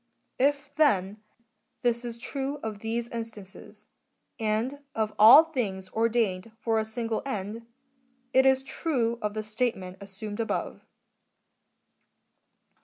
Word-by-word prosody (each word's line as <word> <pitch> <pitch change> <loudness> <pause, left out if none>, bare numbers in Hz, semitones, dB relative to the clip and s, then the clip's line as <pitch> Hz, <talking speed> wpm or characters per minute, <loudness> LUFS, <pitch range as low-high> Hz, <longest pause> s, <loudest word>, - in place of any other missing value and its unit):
^ - - -46 0.4
If, 285 0 +1
then, 210 -9 +2 0.6
this 240 0 +1
is 235 -1 -5
true 275 +3 -4
of 215 -2 -4
these 230 +2 -2
instances, 220 -4 -9 0.5
and 225 +6 -1 0.2
of 215 -1 -1
all 230 +9 +10
things 200 - -3
ordained 225 -3 0
for 225 -1 0
a 220 - -1
single 225 0 -3
end,^ 225 -2 -5 0.7
it 265 +1 +6
is 265 0 +4
true 250 -5 -1
of 210 0 -2
the 215 - -2
statement 215 -4 -2
assumed 205 +2 -7
above. 225 - -3
225 Hz, 120 wpm, -28 LUFS, 210-245 Hz, 0.7 s, all